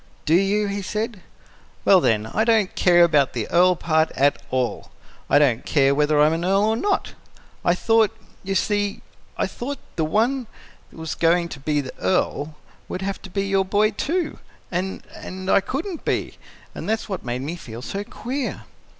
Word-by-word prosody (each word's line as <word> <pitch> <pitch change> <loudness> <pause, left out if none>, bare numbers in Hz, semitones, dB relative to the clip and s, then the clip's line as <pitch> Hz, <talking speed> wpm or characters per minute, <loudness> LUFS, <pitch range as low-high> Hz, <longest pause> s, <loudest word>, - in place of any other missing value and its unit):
"Do 155 - +2
you?" 195 +4 +3
he 200 0 -3
said. 210 +1 -3 0.6
"Well, 190 -2 +6
then, 110 -6 +2
I 210 - 0
don't 225 -4 +2
care 175 -1 +5
about 150 -5 +3
the 115 -3 -3
earl 180 +1 +5
part 160 -1 +1
at 140 +2 +2
all. 130 -2 -2 0.4
I - - +5
don't 135 -6 +3
care 140 -2 +3
whether 150 +1 +2
I'm 150 +2 +5
an 165 +1 -2
earl 195 +3 +3
or 220 +1 +2
not. 390 - -1 0.5
I 175 - +3
thought 225 +2 +3 0.3
you 195 0 -2
see, 205 +1 0 0.3
I - - +1
thought 275 +4 -5 0.2
the 160 - +1
one 230 - +1 0.4
that - - -17
was 160 -2 -4
going 170 +1 +2
to 145 - -8
be 145 +1 0
the 130 - -8
Earl 155 -4 0 0.3
would 185 - -4
have 195 0 -3
to - - -10
be 195 +2 -1
your 195 -1 +2
boy, 210 +3 +2
too, 325 - -2 0.3
and 185 +2 -3
and 185 +1 -5
I - - +5
couldn't 315 - -4
be. - - -2 0.3
That - - -7
was 220 +1 -1
what 190 -5 -4
made 125 +1 -3
me 160 +5 -4
feel 120 -7 -9
so 200 +7 -4
queer." 255 +6 -4
185 Hz, 185 wpm, -23 LUFS, 155-210 Hz, 0.6 s, Well